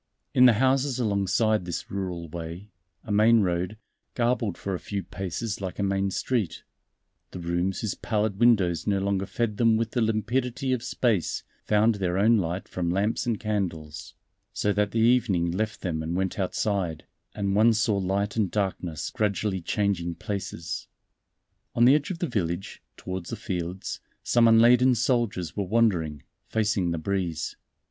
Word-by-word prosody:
In 125 0 +7
the 120 - +6
houses 130 +3 +2
alongside 110 -1 +1
this 85 -1 -5
rural 90 -4 -4
way 85 +5 -7 0.3
a 110 - -6
main 110 +2 +5
road, 90 +2 -1 0.4
garbed 120 -5 0
for 100 - -4
a 90 - -2
few 100 -2 -4
paces 95 +3 -4
like 95 -2 -5
a 100 - -1
main 100 0 +1
street 100 -4 -2 0.7
the - - -8
rooms 85 +2 -1
whose 110 - -1
pallid 105 -3 -1
windows 100 -9 +3
no 100 -1 +2
longer 95 0 -1
fed 110 -2 -2
them 115 -1 +4
with 115 0 -1
the 120 - 0
limpidity 120 +4 0
of 125 - -1
space 115 -6 0 0.2
found 110 +2 +3
their 90 0 0
own 110 +4 +5
light 90 -1 -2
from 85 -2 -2
lamps 100 +7 0
and 115 -3 0
candles, 85 -8 -4 0.4
so 105 - 0
that 105 +1 +1
the 115 - -4
evening 110 -7 +3
left 105 +4 -2
them 80 -4 -2
and 80 +2 -3
went 95 +1 -1
outside, 95 -3 -1 0.3
and 100 -1 -1
one 110 +3 +6
saw 110 -1 +1
light 100 +2 -1
and 105 -5 +1
darkness 90 -5 -2
gradually 100 -2 -1
changing 85 -2 -1
places. 100 -6 -5 0.9
On 120 - +5
the 130 - +7
edge 145 -1 +1
of 185 - -3
the 175 - -1
village, 95 - -3 0.2
towards 90 -2 -5
the - - -3
fields, 95 -3 -4 0.2
some 120 -1 +4
unladen 120 +3 +6
soldiers 115 - 0
were 100 - -1
wandering, 90 - +1 0.2
facing 105 -5 0
the 85 - -1
breeze. 90 -1 -2
100 Hz, 165 wpm, -26 LUFS, 90-115 Hz, 0.9 s, In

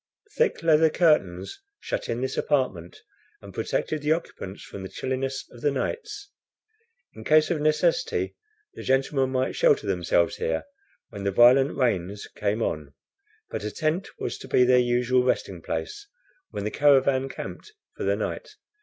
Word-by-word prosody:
Thick 475 - +1
leather 160 -1 +5
curtains 100 - +1 0.2
shut - - -4
in 115 +1 -2
this 130 0 -2
apartment, 105 - -1 0.4
and - - -12
protected 155 -1 -2
the 150 +1 +3
occupants 105 - -6
from 100 - -9
the 95 - -7
chilliness 130 +1 -3
of 120 - -14
the 145 - +2
nights. 415 - -4 0.8
In - - -10
case 155 0 +4
of 160 -4 0
necessity, 155 - +1 0.4
the - - -9
gentlemen 135 0 +1
might 130 0 -1
shelter 475 -4 +3
themselves - - +1
here, 470 +2 -1 0.5
when 100 -1 -8
the 100 - +1
violent 125 +7 +5
rains 100 -6 0
came 105 +2 -1
on, 75 -3 -4 0.6
but - - -4
a 105 - -2
tent 155 - -1
was 120 - -4
to - - -10
be 125 - +4
their 125 0 +5
usual 125 +1 +2
resting 125 - -1
place 410 -1 -5 0.4
when - - -5
the 105 - -2
caravan 135 -2 +3
camped 425 - -8 0.2
for - - -10
the - - +2
night. - - -5
130 Hz, 160 wpm, -25 LUFS, 115-155 Hz, 0.8 s, leather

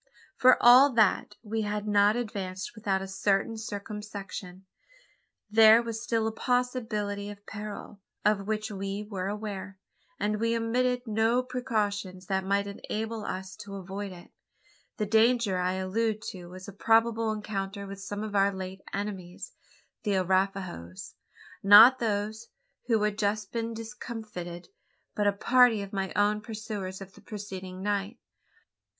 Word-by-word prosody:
For 255 0 +6
all 255 +4 +8
that, 210 -1 +2
we 220 0 -2
had 210 0 -3
not 205 +1 +4
advanced 200 -3 -4
without 200 -4 -1
a - - -6
certain 195 +3 0
circumspection. 205 -3 -7 0.8
There 220 +2 +7
was 230 -1 -4
still 230 -2 0
a 220 - 0
possibility 225 -5 -1
of 205 0 -11
peril, 210 -1 -8 0.2
of 205 -1 +2
which 215 0 -2
we 195 +1 -4
were 190 -3 -3
aware; 200 -2 -5 0.4
and 210 0 0
we 230 +1 +1
omitted 245 +2 0
no 225 +3 +2
precautions 210 -7 -2
that 190 +1 -1
might 200 +1 +1
enable 215 +2 -4
us 190 +1 -5
to 205 -2 -8
avoid 195 +1 -6
it. 175 -1 -13 0.7
The 215 - 0
danger 220 -2 +3
I 180 0 +1
allude 215 +4 -1
to 180 -2 -10
was 185 +1 -10
a 200 - -8
probable 225 +2 +3
encounter 200 -2 -4
with 195 0 -8
some 205 +1 -5
of 210 -1 -5
our 200 0 +4
late 190 0 -7
enemies 195 -3 -5 0.5
the 205 -3 0
Arapahoes. 185 - -1 0.5
Not 220 +6 +9
those 215 0 -2 0.4
who 225 -3 +2
had 210 0 0
just 210 -1 -1
been 230 -1 -3
discomfited; 220 -7 -7 0.4
but 205 -1 +1
a - - +5
party 225 +1 +4
of 200 - -10
my 195 -1 -2
own 205 +1 +2
pursuers 210 -4 -6
of 195 0 -10
the - - -16
preceding 190 -3 -7
night. 205 +2 -1
205 Hz, 145 wpm, -28 LUFS, 195-225 Hz, 0.8 s, Not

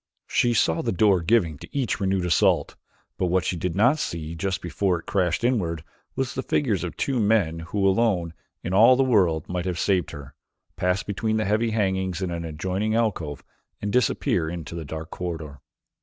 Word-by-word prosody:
She 120 -1 +1
saw 80 -6 +2
the - - -1
door 95 -1 +3
giving 85 -6 +1
to 145 - -8
each 125 -7 0
renewed 95 -2 0
assault, 85 - +2 0.4
but 90 - +1
what 90 +1 +1
she - - -1
did 85 0 -3
not 125 +10 +4
see 80 - -4
just 95 +3 -2
before 95 -4 -1
it - - -15
crashed 90 +1 0
inward 90 -11 0 0.3
was 135 -2 -2
the 130 - -2
figures 115 -9 0
of 90 - -4
the - - -35
two 135 -3 0
men 100 -7 +2
who 95 +4 -1
alone, 95 -5 +1 0.3
in 90 - -3
all 115 +6 +7
the 135 - +3
world, 90 - +2
might 90 0 -3
have 90 -2 -2
saved 90 -1 +1
her, 70 -3 -10 0.4
pass 90 +2 0
between 110 +2 -1
the 110 - 0
heavy 110 +3 +1
hangings 95 -4 -1
in 95 -2 -2
an 85 0 -4
adjoining 95 +7 -2
alcove 90 -11 -1 0.4
and 105 0 -3
disappear 120 -9 +1
into 85 0 -6
a 80 - -7
dark 80 +2 -7
corridor. 80 -6 -6
95 Hz, 195 wpm, -24 LUFS, 85-110 Hz, 0.4 s, all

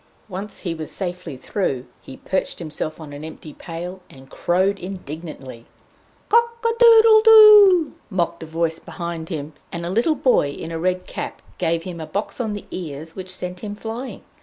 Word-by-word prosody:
Once 195 +1 -7
he 175 -4 -2
was 160 -2 -6
safely 180 -7 -5
through, 130 -3 -2 0.2
he 130 - -11
perched 190 - -2
himself 155 -1 -5
on 150 -3 -9
an 145 +1 -8
empty 155 -1 -9
pail, 175 +3 -7
and 135 0 -16
crowed 190 +3 +1
indignantly. 155 -9 -8 0.6
"Cock 465 +1 +3
adoodle 455 -1 +7
do 450 - +5
oo!" 415 -6 +8 0.2
mocked 170 -4 -1
a 160 - -7
voice 165 0 -1
behind 170 -2 -6
him, 155 -3 -5 0.2
and 170 0 -5
a 175 - -3
little 240 - +2
boy 255 - +3
in 160 +3 -7
a 165 - -3
red 185 +1 -1
cap - - -6 0.2
gave 165 -1 0
him 175 -2 -7
a 160 - -6
box 205 +5 -3
on 220 -3 -2
the 205 - -7
ears 160 -2 -6
which 185 -1 -7
sent 180 0 -5
him 205 +1 -6
flying. 225 +5 -6
180 Hz, 180 wpm, -22 LUFS, 160-210 Hz, 0.6 s, oo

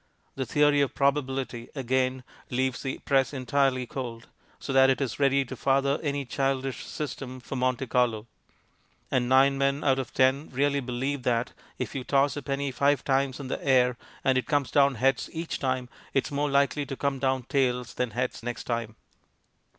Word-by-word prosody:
The 130 -2 -4
Theory 145 -1 +4
of 140 - 0
Probability, 135 -4 -1
again, 130 -1 0 0.3
leaves 130 0 -1
the 135 - -3
press 135 0 +2
entirely 130 -1 +1
cold, 120 -4 -6 0.3
so 135 - -5
that 135 0 +6
it 130 - +2
is 135 -2 -3
ready 140 -1 +3
to - - -7
father 140 +1 +1
any 140 -2 -2
childish 135 0 -1
"system" 135 -4 -5
for 125 +2 -7
Monte 130 0 0
Carlo. 120 -3 +1 0.9
And 125 -1 +1
nine 135 +1 +5
men 140 +1 +1
out 135 -1 +3
of 130 - -4
ten 130 +3 +2
really 140 +2 +1
believe 130 +2 -2
that, 120 0 0 0.2
if - - -4
you 135 - -3
toss 140 +2 +2
a 145 - -4
penny 140 +1 -2
five 140 +3 +2
times 135 -1 +1
in 140 - -6
the - - -4
air 125 -2 +4 0.3
and 130 -1 +3
it 125 - -5
comes 145 -2 +1
down 140 -2 +4
heads 135 +3 +1
each 165 0 -4
time, 130 -2 -1 0.3
it 135 - +3
is - - -7
more 145 +1 0
likely 140 +1 +2
to 135 - -4
come 140 -1 -1
down 130 -1 0
tails 125 -2 0
than 125 -1 -1
heads 125 +3 -3
next 120 +1 -5
time. 115 -2 -3
135 Hz, 185 wpm, -27 LUFS, 125-140 Hz, 0.9 s, that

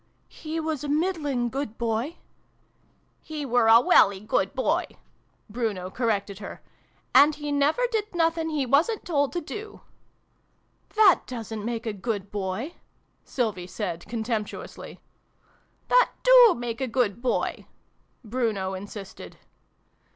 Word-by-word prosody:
" - - -41 0.2
he 320 +1 -3
was 315 -3 -3
a 290 - -4
middling 295 -6 0
good 240 -2 -4
Boy 235 +7 -2 0.5
" - - -39 0.3
"He 305 -2 -6
were 245 -3 +3
a 225 +1 +8
welly 200 -5 +5
good 200 +2 -1
Boy! 310 +7 +1 0.3
" - - -41
Bruno 205 -5 -3
cor 240 +2 -2
rected 200 -2 -1
her. 200 - -8 0.5
"And 290 +3 +7
he 295 -1 -5
never 290 - +2
did 425 -4 -2
nothing 330 -1 +1
he 300 -4 -1
wasn't 320 - +2
told 285 -5 +1
to 350 - -2
do 420 +6 -8 0.4
" - - -43
" - - -35
That 425 -5 +5
doesn't 225 -3 -6
make 230 0 -3
a 220 - -2
good 200 -1 -4
Boy! 205 - -3 0.3
" - - -43
Sylvie 210 -8 -2
said 180 -3 -5
contemptuously. 220 -1 -5 0.5
" - - -38
That - - +5
do - - +8
make 240 0 -4
a 265 - 0
good 235 -3 0
Boy! 255 - -1 0.3
" - - -42
Bruno 215 -5 -1
in 190 +2 -6
sisted. 200 -2 -10
245 Hz, 155 wpm, -26 LUFS, 215-310 Hz, 0.5 s, a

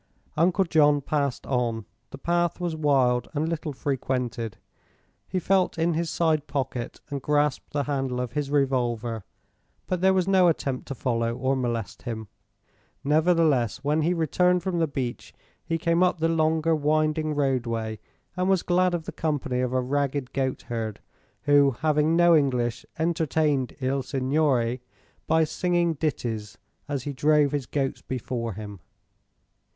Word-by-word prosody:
Uncle 175 +5 +3
John 150 -4 +4
passed 140 -2 -1
on. 120 -4 -1 0.2
The - - -9
path 175 +4 0
was 175 -2 -2
wild 130 -5 +2
and 150 +2 0
little 165 -2 -3
frequented. 125 -5 -2 0.7
He - - -3
felt 185 0 +1
in 165 +1 +1
his 165 +1 -1
side 155 -3 +1
pocket 130 -4 -3
and 140 -1 -3
grasped 150 0 0
the 145 -1 0
handle 135 -3 -2
of 125 -2 -3
his 145 +1 -2
revolver; 120 -6 0 0.6
but 180 -1 -2
there 190 0 +4
was 185 -1 +1
no 190 -2 +5
attempt 135 -5 -1
to 135 - -5
follow 115 -2 -1
or 135 +2 0
molest 120 -4 -3
him. 110 -4 -6 0.7
Nevertheless, 155 -6 +2
when 150 +2 +1
he 165 +3 +2
returned 180 +2 +2
from 180 -2 -1
the 165 - +2
beach 130 -4 -5 0.3
he 165 0 -1
came 170 +1 +1
up 180 0 +3
the 165 0 +1
longer 160 0 +2
winding 155 0 +1
roadway 115 -6 -1 0.4
and 185 +1 0
was 190 -3 +3
glad 180 0 +2
of 165 - -4
the - - -6
company 145 -5 -2
of 125 -1 -1
a 130 0 +1
ragged 140 0 -1
goatherd 120 -5 -3 0.4
who, 145 -3 +4
having 155 +1 +2
no 175 0 +6
English, 125 -6 0
entertained 155 -5 0
"Il 135 +1 0
Signore" 130 -2 0 0.5
by 160 0 +4
singing 175 +1 +1
ditties 120 -9 -3 0.3
as 140 -3 -3
he 145 - -4
drove 145 +1 +3
his 145 -4 -2
goats 135 -2 -2
before 120 -3 -4
him. 105 -1 -8
145 Hz, 150 wpm, -26 LUFS, 125-160 Hz, 0.7 s, no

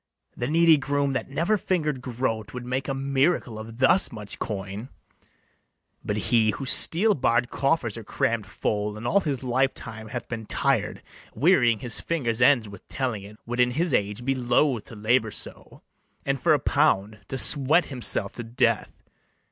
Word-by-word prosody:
The 120 - -3
needy 165 0 +5
groom, 140 0 -1
that 130 - -3
never 170 +10 +1
finger'd 155 -9 -1
groat, 115 -3 -3
Would 125 -1 -6
make 130 +2 -3
a 135 - -1
miracle 135 -3 0
of 110 +1 -9
thus 135 +9 +4
much 105 -4 -7
coin; 100 +3 -5 1.1
But 105 - -2
he 110 +1 +2
whose 130 +5 -2
steel 210 +6 +3
barr'd 120 -4 +1
coffers 135 -5 0
are 115 - -7
cramm'd 110 0 -1
full, 105 0 -2
And 110 - -8
all 200 - +3
his 140 -8 -3
life 130 +2 +1
time 110 -1 -8
hath 120 +1 -6
been 115 -2 -6
tired, - - 0 0.3
Wearying 125 - +4
his 120 -2 +1
fingers' 125 -8 -2
ends 130 -4 +4
with 100 -2 -13
telling 125 -6 -3
it, 105 +2 -12
Would 120 +1 -4
in 125 0 +4
his 160 +8 0
age 105 +4 -1
be 135 - +2
loath 125 -1 +1
to - - -11
labour 110 +2 +1
so, - - -6 0.4
And - - -1
for - - +4
a - - -1
pound 105 +3 +1
to 135 - -4
sweat 145 +5 +4
himself 125 -2 +2
to 120 - -7
death. 115 -1 0
125 Hz, 175 wpm, -25 LUFS, 110-135 Hz, 1.1 s, needy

